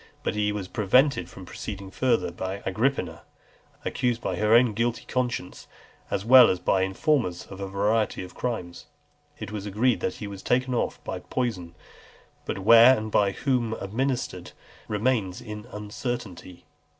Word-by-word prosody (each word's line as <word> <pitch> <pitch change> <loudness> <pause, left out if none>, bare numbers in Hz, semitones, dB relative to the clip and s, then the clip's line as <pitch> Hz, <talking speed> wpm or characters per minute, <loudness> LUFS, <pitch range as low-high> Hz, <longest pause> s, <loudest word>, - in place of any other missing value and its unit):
But - - -1
he 105 0 0
was 105 -3 -4
prevented 105 - +2
from 95 - -11
proceeding 100 +1 -7
further 115 -7 +1
by 95 +3 -5
Agrippina, 120 +9 -1 0.6
accused 120 -2 0
by - - -3
her 105 +1 +4
own 120 -2 +5
guilty 115 +2 -1
conscience, 125 -7 -3 0.4
as 100 - -2
well 125 0 +8
as 95 - +1
by 95 +2 +1
informers, 95 - 0
of 95 - -11
a 100 - -3
variety 105 +1 0
of 90 - -10
crimes. 100 -8 -5 0.5
It - - -7
is 105 -1 -5
agreed 110 +5 +1
that 90 - -2
he 105 - -7
was 100 -1 -8
taken 130 +1 +1
off 120 - -1
by - - -4
poison; 95 -10 -3 0.7
but - - -3
where, 115 +6 +7
and 110 0 -5
by 100 -1 +3
whom 125 -4 0
administered, 110 -3 -3 0.3
remains 105 -3 0
in 105 0 -8
uncertainty. 105 -4 -6
105 Hz, 155 wpm, -26 LUFS, 95-120 Hz, 0.7 s, well